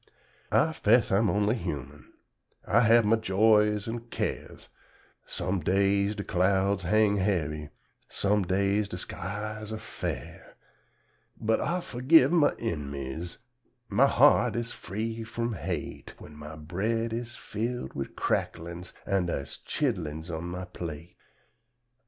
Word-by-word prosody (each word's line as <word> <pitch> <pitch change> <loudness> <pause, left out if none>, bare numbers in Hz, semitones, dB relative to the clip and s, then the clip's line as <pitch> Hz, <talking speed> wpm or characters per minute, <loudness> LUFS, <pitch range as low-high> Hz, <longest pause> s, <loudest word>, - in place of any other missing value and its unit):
I - - +3
'fess - - +3
I'm 100 +2 +3
only 105 +1 +2
humun, 75 - -5 0.6
I 115 - +4
hab 115 -1 +5
my 115 +2 +4
joys 105 +1 +3
an' 115 +1 -5
cares - - -4 0.6
Sum 90 +2 -2
days 100 +4 +2
de 100 - -4
clouds 95 +2 +2
hang 105 +3 +3
hebby, 75 -6 -1 0.4
sum 105 +1 +1
days 100 +3 +1
de - - -5
skies 110 +3 -5
ar' 110 - -3
fair; - - -6 0.8
But 110 +1 +1
I 175 +3 0
forgib 130 +5 +4
my 165 -4 +4
in'miz, 75 - -4 0.5
my 120 +7 +5
heart 130 -3 +5
is 120 0 -3
free 115 +3 -4
frum 115 +1 -3
hate, 95 - -5
When 75 - -12
my 75 +1 -9
bread 105 +9 -2
is 120 +1 -4
filled 120 +4 -4
wid 70 - -5
cracklins 85 +2 -2
an' 95 -3 +1
dar's 70 -5 -4
chidlins 80 +1 -2
on 80 +2 -5
my 90 +1 -5
plate. 85 -1 -7
100 Hz, 130 wpm, -28 LUFS, 85-110 Hz, 0.8 s, hab